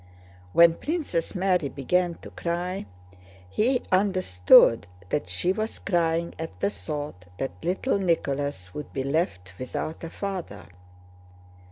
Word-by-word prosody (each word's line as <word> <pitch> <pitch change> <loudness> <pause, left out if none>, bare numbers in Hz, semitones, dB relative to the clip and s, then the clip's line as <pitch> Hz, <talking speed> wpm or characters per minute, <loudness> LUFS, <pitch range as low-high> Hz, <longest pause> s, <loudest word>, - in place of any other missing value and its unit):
When 170 - +7
Princess 290 - -2
Mary 180 -5 +2
began 175 +6 0
to - - -9
cry, 175 - -3 0.6
he 240 - +1
understood 150 - +5 0.2
that 90 - -1
she 135 - +1
was 220 +2 -3
crying 170 -2 0
at 160 0 -6
the 200 - +1
thought 145 - -6
that 135 - -2
little 190 +6 0
Nicholas 140 - -1
would 150 - -7
be 135 - -1
left 135 - -1
without 140 +6 -4
a 165 - -4
father. 195 -1 -5
170 Hz, 125 wpm, -26 LUFS, 135-185 Hz, 0.6 s, When